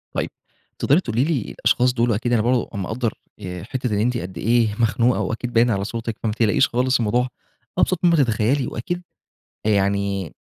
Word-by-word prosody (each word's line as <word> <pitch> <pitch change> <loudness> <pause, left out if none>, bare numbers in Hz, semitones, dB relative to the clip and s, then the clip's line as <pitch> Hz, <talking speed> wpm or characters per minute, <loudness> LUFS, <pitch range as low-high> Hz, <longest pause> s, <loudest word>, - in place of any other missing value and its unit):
طيب، - - -1 0.5
تقدري 145 +6 +4
تقولي 120 -1 0
لي 150 -6 0
الأشخاص 120 +3 +2
دول 120 -1 +2
أكيد 120 +3 -1
أنا 110 - +3
برضه 125 +1 +1
مقدّر 110 +4 -2 0.3
آآ، 90 -2 -6
حتّة 125 -1 -3
إن - - 0
أنتِ 120 +2 +1
قد 95 -3 -6
ايه 115 -1 +2
مخنوقة 120 +2 +2
وأكيد 120 +2 -3
باين 120 +1 +4
على 100 -1 0
صوتِك، 115 +1 -4
فما 110 - +1
تقلقيش 115 +3 +3
خالص 125 +2 +1
الموضوع 120 +3 +1 0.5
أبسط 180 -1 +2
ما 170 -1 +5
تتخيلي، 125 0 +2
وأكيد 175 +10 -4 0.6
يعني 100 -3 0
115 Hz, 170 wpm, -22 LUFS, 105-125 Hz, 0.6 s, ما